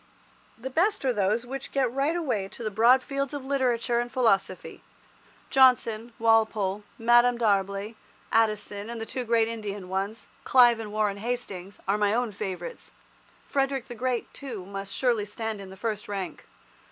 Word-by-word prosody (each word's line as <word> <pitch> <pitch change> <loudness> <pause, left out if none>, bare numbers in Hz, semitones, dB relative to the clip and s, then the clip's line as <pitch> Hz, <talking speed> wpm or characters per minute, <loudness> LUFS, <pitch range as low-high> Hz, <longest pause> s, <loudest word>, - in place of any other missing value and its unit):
The 260 +4 -6
best 365 +3 +1
are 255 - +3
those 210 +3 +1
which 270 +2 -6
get 265 -4 +1
right 280 +5 +1
away 255 - -1
into 215 +4 -9
the 215 - -2
broad 240 +5 +5
fields 275 0 -3
of 275 -2 -6
literature 250 -3 +1
and 240 0 -3
philosophy. 220 -7 0 0.7
Johnson, 240 -3 +4
Walpole, 220 -3 +2
Madame 240 +1 +5
D'Arblay, 200 -1 0 0.4
Addison, 215 -1 0
and 235 -1 -5
the 225 - -4
two 250 +3 -4
great 230 -1 +3
Indian 205 -4 -5
ones, 195 +4 -3 0.2
Clive 240 -4 +6
and 215 -2 -6
Warren 210 -2 0
Hastings, 200 -4 -4
are 200 +2 +1
my 205 +1 +2
own 245 -2 0
favourites. 200 - -6 0.6
Frederick 270 -2 -1
the - - -5
Great, 245 0 -2
too, 235 -10 -7
must 195 0 -6
surely 240 -5 +1
stand 215 0 -5
in 195 - -9
the 190 - -11
first 215 0 -3
rank. 190 -5 -5
225 Hz, 165 wpm, -27 LUFS, 205-250 Hz, 0.7 s, Clive